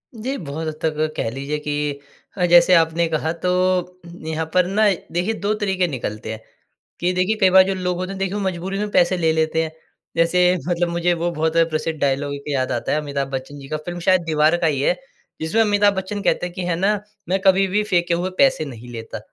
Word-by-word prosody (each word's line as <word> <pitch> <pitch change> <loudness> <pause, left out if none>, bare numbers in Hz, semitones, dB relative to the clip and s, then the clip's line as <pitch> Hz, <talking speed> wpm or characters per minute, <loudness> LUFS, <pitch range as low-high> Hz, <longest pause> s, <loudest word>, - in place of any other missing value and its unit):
जी, 255 +5 -3
बहुत 160 0 -5
हद 155 - -2
तक 155 -1 -1
कह - - -1
लीजिए 140 +4 -3
कि 145 -1 -2 0.4
अ, 180 - +2
जैसे 175 +1 +6
आपने 165 0 +3
कहा 160 0 -1
तो 180 - +2 0.8
यहाँ 160 0 -2
पर 180 -1 +4
ना 200 +4 +1 0.3
देखिए 180 +6 0
2 205 +1 +2
तरीके 190 -3 +1
निकलते 110 -7 -5
हैं 110 - -8 0.6
कि 175 +1 +1
देखिए 185 +4 +1
कई 190 - +6
बार 190 0 +7
जो 195 - 0
लोग 180 -1 -2
होते 185 +1 -4
हैं 195 - -6
देखिए 195 0 -1
वो - - -1
मजबूरी 190 0 -3
में 210 0 -2
पैसे 180 0 +3
ले 165 -2 +2
लेते 160 0 +1
हैं। 160 - -4 0.5
जैसे 180 +2 +4
मतलब 175 -1 0
मुझे 170 +1 +1
वो 170 0 -1
बहुत 160 0 -1
प्रसिद्ध 155 0 -2
डायलॉग 140 +1 0
एक 140 - -9
याद 135 -3 -1
आता - - -2
है - - +2
अमिताभ 140 -2 -3
बच्चन 135 +2 -5
जी 135 - -10
का, 155 - -2
फिल्म 175 +3 -6
शायद 185 +1 +3
दीवार 155 +1 +3
का 170 - +1
ही 140 -3 0
है 160 - +2 0.5
जिसमें 160 +8 +1
अमिताभ 205 -1 +3
बच्चन 190 +2 -3
कहते 180 -2 0
कि 180 +1 -6
है 175 -1 0
ना 195 +5 +2 0.3
"मैं 190 +1 +2
कभी 195 0 +5
भी 205 +3 +1
फेंके 175 -4 +1
हुए 175 +2 -1
पैसे 265 - +3
नहीं 120 -3 -10
लेता।" 115 -1 -7
170 Hz, 225 wpm, -21 LUFS, 155-185 Hz, 0.8 s, बार